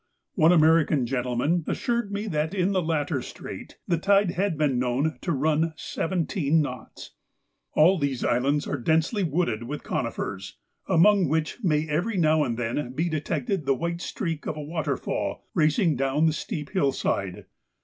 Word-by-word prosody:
One 160 Hz, +2 st, +5 dB
American 160 Hz, -4 st, +4 dB
gentleman 125 Hz, +7 st, 0 dB
assured 235 Hz, -4 st, -1 dB
me 205 Hz, +1 st, -3 dB
that 155 Hz, +3 st, -1 dB
in 185 Hz, 0 st, +1 dB
the 190 Hz, -2 st, +1 dB
latter 150 Hz, -4 st, -1 dB
strait -, -, -9 dB
the 170 Hz, -2 st, +1 dB
tide 200 Hz, 0 st, +3 dB
had 185 Hz, -2 st, -1 dB
been 145 Hz, -5 st, +1 dB
known 130 Hz, +5 st, 0 dB
to 175 Hz, -, -2 dB
run 155 Hz, +2 st, +1 dB
seventeen 165 Hz, -3 st, 0 dB
knots! 125 Hz, -6 st, -5 dB, 0.6 s
All 175 Hz, +4 st, +5 dB
these 140 Hz, -4 st, -1 dB
islands 140 Hz, +4 st, +1 dB
are 145 Hz, -, -2 dB
densely 160 Hz, -, +1 dB
wooded 155 Hz, -9 st, 0 dB
with 140 Hz, +6 st, -6 dB
conifers, 95 Hz, -1 st, -4 dB, 0.3 s
among 195 Hz, +2 st, +4 dB
which 160 Hz, +8 st, -1 dB
may 155 Hz, -3 st, +1 dB
every 180 Hz, +8 st, -1 dB
now 155 Hz, -2 st, +3 dB
and 120 Hz, -5 st, -2 dB
then 120 Hz, +2 st, -2 dB
be 165 Hz, +6 st, -1 dB
detected 160 Hz, -, -2 dB
the 135 Hz, -, +3 dB
white 170 Hz, +4 st, -3 dB
streak 165 Hz, -8 st, -4 dB
of 155 Hz, -, -3 dB
a 150 Hz, -, -5 dB
waterfall 150 Hz, -3 st, -3 dB
racing 155 Hz, 0 st, +2 dB
down 135 Hz, +4 st, +1 dB
the 160 Hz, -, +3 dB
steep 150 Hz, -1 st, -5 dB
hill 145 Hz, -9 st, +2 dB
side. 95 Hz, -7 st, -2 dB
155 Hz, 160 wpm, -26 LUFS, 140-175 Hz, 0.6 s, One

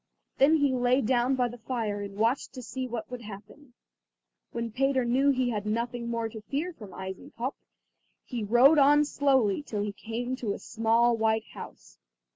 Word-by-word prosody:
Then 285 Hz, +4 st, +6 dB
he 285 Hz, -3 st, +2 dB
lay 250 Hz, +1 st, +2 dB
down 250 Hz, +2 st, +2 dB
by 250 Hz, -1 st, +1 dB
the 240 Hz, 0 st, -10 dB
fire 220 Hz, -3 st, -3 dB
and 200 Hz, 0 st, -7 dB
watched 230 Hz, +5 st, 0 dB
to 255 Hz, -, -8 dB
see 260 Hz, +2 st, -4 dB
what 235 Hz, -1 st, -6 dB
would 250 Hz, -1 st, -6 dB
happen. 230 Hz, +5 st, -12 dB, 0.8 s
When 235 Hz, -1 st, -4 dB
Peter 265 Hz, +1 st, +1 dB
knew 260 Hz, +4 st, +2 dB
that 280 Hz, -, +4 dB
he 255 Hz, -1 st, +1 dB
had 210 Hz, -2 st, -3 dB
nothing 235 Hz, +2 st, -2 dB
more 230 Hz, -1 st, -1 dB
to 220 Hz, 0 st, -9 dB
fear 295 Hz, +10 st, -3 dB
from 210 Hz, -10 st, -11 dB
Eisenkopf, 190 Hz, +8 st, -6 dB, 0.7 s
he 240 Hz, -4 st, -4 dB
rode 250 Hz, +8 st, +6 dB
on 295 Hz, +2 st, +5 dB
slowly 270 Hz, -7 st, +2 dB
till 210 Hz, -8 st, -3 dB
he 205 Hz, -1 st, -3 dB
came 230 Hz, +5 st, -4 dB
to 220 Hz, -6 st, -2 dB
a -, -, -6 dB
small 230 Hz, +1 st, +2 dB
white 220 Hz, 0 st, +1 dB
house. -, -, -11 dB
240 Hz, 185 wpm, -28 LUFS, 220-260 Hz, 0.8 s, Then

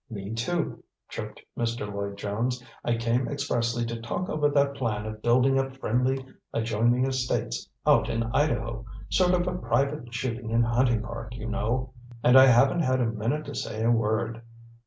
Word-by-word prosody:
"Me, 100 Hz, -2 st, -6 dB
too," 155 Hz, +9 st, -2 dB, 0.3 s
chirped -, -, -6 dB, 0.2 s
Mr. 115 Hz, -2 st, -2 dB
Lloyd 100 Hz, -1 st, -4 dB
Jones. 120 Hz, +5 st, -2 dB, 0.2 s
"I 120 Hz, -1 st, +1 dB
came 115 Hz, +2 st, +1 dB
expressly 120 Hz, -4 st, -1 dB
to 115 Hz, 0 st, -5 dB
talk 115 Hz, +10 st, -3 dB
over 150 Hz, -1 st, +2 dB
that 140 Hz, -1 st, +2 dB
plan 115 Hz, -6 st, -2 dB
of 110 Hz, 0 st, -6 dB
building 130 Hz, +3 st, +4 dB
up 135 Hz, 0 st, -3 dB
friendly 130 Hz, +2 st, 0 dB, 0.3 s
adjoining 115 Hz, +3 st, +2 dB
estates 130 Hz, -2 st, -2 dB, 0.2 s
out -, -, +4 dB
in 115 Hz, -, 0 dB
Idaho; 115 Hz, -6 st, 0 dB, 0.3 s
sort 180 Hz, -1 st, +3 dB
of 180 Hz, 0 st, -1 dB
private 120 Hz, +1 st, 0 dB
shooting 115 Hz, -2 st, -3 dB
and 115 Hz, 0 st, +4 dB
hunting 120 Hz, -1 st, +2 dB
park, 115 Hz, 0 st, -7 dB
you 110 Hz, -2 st, -7 dB
know. 125 Hz, +3 st, -1 dB, 0.3 s
And 125 Hz, -, +6 dB
I 130 Hz, 0 st, +10 dB
haven't 135 Hz, +7 st, +5 dB
had 130 Hz, -4 st, +2 dB
a 125 Hz, -, +2 dB
minute 115 Hz, +7 st, -1 dB
to 145 Hz, -, -7 dB
say 110 Hz, -4 st, -3 dB
a 115 Hz, -, +4 dB
word." 115 Hz, 0 st, 0 dB
120 Hz, 170 wpm, -27 LUFS, 115-135 Hz, 0.3 s, I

